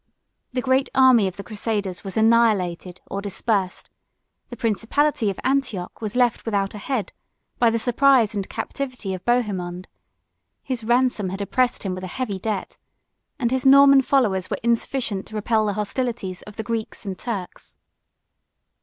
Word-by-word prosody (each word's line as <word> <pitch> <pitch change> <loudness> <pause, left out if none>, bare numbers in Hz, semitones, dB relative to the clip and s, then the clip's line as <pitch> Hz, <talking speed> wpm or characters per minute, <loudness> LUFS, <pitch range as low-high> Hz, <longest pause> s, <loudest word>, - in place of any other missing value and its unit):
The 250 -1 -2
great 265 +1 +2
army 255 -6 +6
of 185 - -6
the 200 - -6
crusaders 205 -3 -3
was 195 +1 -5
annihilated 210 -6 +2
or 200 - -5
dispersed; 200 -1 -2 0.6
the 240 - -8
principality 230 +3 +1
of 195 - -5
Antioch 255 -10 -1
was 215 -1 -4
left 245 -2 +2
without 200 -3 -1
a 210 - -7
head, 220 -3 -3 0.5
by 235 - +5
the 230 - 0
surprise 245 -1 +3
and 200 -2 -4
captivity 255 -8 -4
of 185 - -6
Bohemond; 190 -7 -1 0.8
his 255 -4 -3
ransom 240 -4 +1
had 190 +2 -5
oppressed 245 +5 0
him 190 -2 -2
with 185 0 -6
a - - -4
heavy 215 -7 -2
debt; 205 -1 -4 0.6
and 240 -4 0
his 260 0 0
Norman 275 0 +7
followers 215 -9 +1
were - - -2
insufficient 235 -3 -1
to 220 - -10
repel 215 0 +1
the 205 - 0
hostilities 210 -3 -3
of 210 - -10
the 220 - -4
Greeks 225 -2 -4
and 195 -2 -4
Turks. 200 -7 -6
220 Hz, 160 wpm, -23 LUFS, 195-250 Hz, 0.8 s, Norman